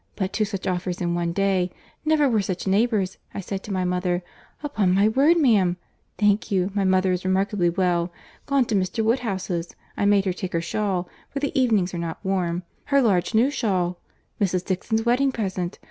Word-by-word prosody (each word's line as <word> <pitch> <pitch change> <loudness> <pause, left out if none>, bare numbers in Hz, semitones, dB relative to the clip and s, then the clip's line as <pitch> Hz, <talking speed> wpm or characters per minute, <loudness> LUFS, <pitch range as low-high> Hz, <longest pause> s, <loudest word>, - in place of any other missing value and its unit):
—But 190 -1 -2
two 215 - +1
such 195 -2 -5
offers 180 -1 -2
in 175 -1 -1
one 170 -1 -1
day!—Never 195 - 0
were 225 -5 +2
such 185 -2 -3
neighbours. 200 -1 +1 0.2
I - - -3
said 195 0 -4
to 210 - -8
my 185 -1 0
mother, 180 0 0 0.4
'Upon 210 -11 +1
my 200 +2 +4
word, 280 +9 +4
ma'am—.' 205 - +3 0.4
Thank 210 +2 +2
you, 190 -1 +1
my 200 -1 +1
mother 185 0 +3
is 180 0 -1
remarkably 190 -1 +1
well. 175 -1 0 0.4
Gone 275 -2 +3
to 220 - -1
Mr. 195 +4 0
Woodhouse's. 190 -7 -1 0.2
I - - 0
made 200 -1 +4
her 185 - 0
take 185 0 -5
her 165 - +1
shawl—for 185 +7 -3
the 285 0 -1
evenings 225 -10 +2
are 175 - -3
not 165 -1 -4
warm—her 185 +8 -1
large 200 -5 +2
new 245 +6 +4
shawl— 185 -9 -1 0.4
Mrs. 185 -2 +1
Dixon's 220 +4 -1
wedding 260 +3 +3
present. 190 -6 -3
195 Hz, 180 wpm, -24 LUFS, 180-220 Hz, 0.4 s, my